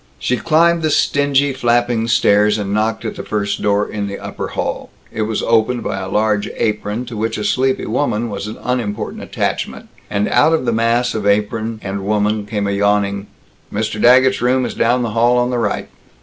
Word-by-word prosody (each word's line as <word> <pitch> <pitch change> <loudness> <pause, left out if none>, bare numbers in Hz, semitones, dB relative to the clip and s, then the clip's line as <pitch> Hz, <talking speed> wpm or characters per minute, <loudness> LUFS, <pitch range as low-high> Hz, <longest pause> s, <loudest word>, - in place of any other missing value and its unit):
She 125 - 0
climbed 170 +3 +3
the 155 - +1
stingy, 145 -1 +2
flapping 120 -2 +1
stairs, 105 -2 +3
and 100 -1 -3
knocked 110 +2 -1
at 110 - -3
the - - -5
first 100 -1 -2
door 105 0 +1
in 105 -1 -4
the 100 0 -5
upper - - -6
hall. - - -4 0.2
It 110 - -3
was 110 - -1
opened 115 +2 +1
by 95 - -3
a 95 0 -5
large 105 0 +1
apron, 105 +1 -1
to 120 -2 -8
which 110 +1 -2
a 105 - -3
sleepy 130 +4 +1
woman 120 -2 -1
was 100 +1 -5
an 110 - -7
unimportant 115 -4 -3
attachment, - - -3 0.2
and 100 +1 0
out 160 +2 +4
of 160 -5 0
the - - +1
mass 115 +2 +1
of 105 -2 -2
apron 110 +2 0
and 95 0 -4
woman 105 +1 0
came 105 -1 -2
a 100 - 0
yawning, 100 0 0 0.4
"Mr. 110 0 -2
Daggett's 130 +1 +5
room 125 +1 +2
is - - -4
down 120 +2 +1
the 115 - -2
hall 120 +3 +3
on 125 0 +1
the 125 - 0
right." 110 -3 -1
110 Hz, 200 wpm, -18 LUFS, 105-125 Hz, 0.4 s, Daggett's